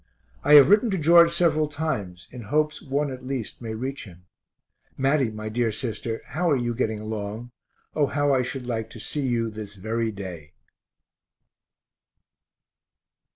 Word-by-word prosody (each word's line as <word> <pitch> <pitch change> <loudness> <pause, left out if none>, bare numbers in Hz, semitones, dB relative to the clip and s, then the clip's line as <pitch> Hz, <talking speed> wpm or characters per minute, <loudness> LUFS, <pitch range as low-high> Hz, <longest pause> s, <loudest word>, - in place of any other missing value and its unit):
I 150 - +6
have 145 +5 +9
written 215 +3 +5
to 195 - 0
George 170 +1 +6
several 160 -3 +2
times 145 - -4
in 125 - -8
hopes 150 +7 0
one 140 +1 -1
at 130 - -8
least 130 -4 -5
may 110 -2 -5
reach 130 +4 -5
him. 90 -2 -15 0.7
Matty, 135 -2 +2
my 110 0 -7
dear 115 +1 0
sister, 115 0 -4
how 175 +3 -1
are 145 - +4
you 120 -1 -1
getting 110 -3 -1
along? 110 +2 -5 0.4
O 145 -2 +2
how 145 +1 +1
I 130 - +3
should 125 +1 -5
like 115 -2 -3
to 115 - -11
see 145 +7 -3
you 115 -2 0
this 105 -2 -8
very 110 +3 -2
day. 90 -7 -8
120 Hz, 155 wpm, -25 LUFS, 110-145 Hz, 0.7 s, have